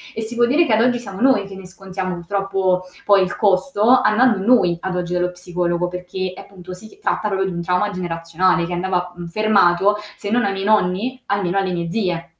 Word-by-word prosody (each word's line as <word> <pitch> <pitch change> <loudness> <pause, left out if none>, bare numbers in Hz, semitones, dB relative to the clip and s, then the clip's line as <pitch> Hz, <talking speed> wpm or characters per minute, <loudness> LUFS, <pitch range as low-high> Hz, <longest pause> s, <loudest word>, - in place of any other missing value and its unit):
e 225 - -3
si 225 +2 -4
può 240 - +4
dire 300 +7 +3
che 235 - -2
ad 220 - +4
oggi 245 0 +2
siamo 195 -5 -9
noi 260 -6 +3
che 195 -1 -10
ne 190 -1 -10
scontiamo 185 -1 -5
purtroppo 190 0 -1 0.2
poi 200 -2 +5
il 180 - -3
costo 205 +2 +1 0.2
andando 235 -1 +3
noi 205 -9 +4
ad 190 -1 -3
oggi 180 -1 -3
dallo 180 0 0
psicologo 175 0 -2
perché 180 +1 -5
appunto 185 -2 -11
si 220 - -12
tratta 210 - -1
pro 195 -1 0
di 190 - -2
un 170 0 -4
trauma 180 +4 0
generazionale 175 0 0
che 175 - -5
andava 180 0 -2
mhmm, 175 -1 -8
fermato 205 0 +3 0.2
se 205 - -6
non 240 +1 +2
ai 200 - 0
miei 195 0 -4
nonni 215 +5 +1
almeno 195 -2 -1
alle 190 -2 0
mie 170 -1 -3
zie. 180 -6 -2
190 Hz, 215 wpm, -20 LUFS, 180-210 Hz, 0.2 s, poi